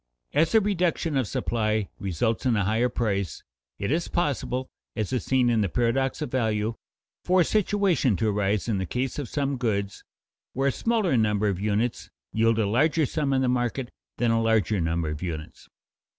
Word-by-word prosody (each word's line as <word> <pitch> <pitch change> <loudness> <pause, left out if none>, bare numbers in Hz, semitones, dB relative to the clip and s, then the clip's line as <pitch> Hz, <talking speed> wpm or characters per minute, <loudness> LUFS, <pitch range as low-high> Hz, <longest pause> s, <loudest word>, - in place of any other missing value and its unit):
As 160 +7 +2
a - - +8
reduction 180 -5 0
of 130 -5 +1
supply 110 +1 -1
results 110 +6 -1
in 120 - +3
a 100 -3 +1
higher 110 +5 +2
price, 100 - -2 0.3
it 100 +3 -2
is 165 +3 0
possible, 130 -5 -1 0.3
as 110 +2 -2
is 125 - 0
seen 130 -2 +2
in 115 -2 +3
the 100 - 0
paradox 130 - 0
of 130 - -5
value, 110 -3 0 0.5
for 185 0 +4
a - - +3
situation 200 - +2
to 110 +4 +1
arise 105 0 0
in 105 -4 0
the 95 - -3
case 130 - -2
of 140 - -5
some 140 -2 -1
goods, 100 -5 -2 0.5
where 135 +2 +1
a - - +1
smaller 220 - +1
number 105 -2 +2
of 95 -2 -2
units 110 +3 -1 0.2
yield 115 0 +3
a 110 - +2
larger 150 +9 +2
sum 145 +1 -1
in 130 -1 +2
the - - +2
market 125 0 -1 0.3
than 120 -1 +2
a 115 0 +2
larger 110 -4 +2
number 85 0 0
of 75 0 -5
units. 80 -4 -6
120 Hz, 190 wpm, -26 LUFS, 105-135 Hz, 0.5 s, a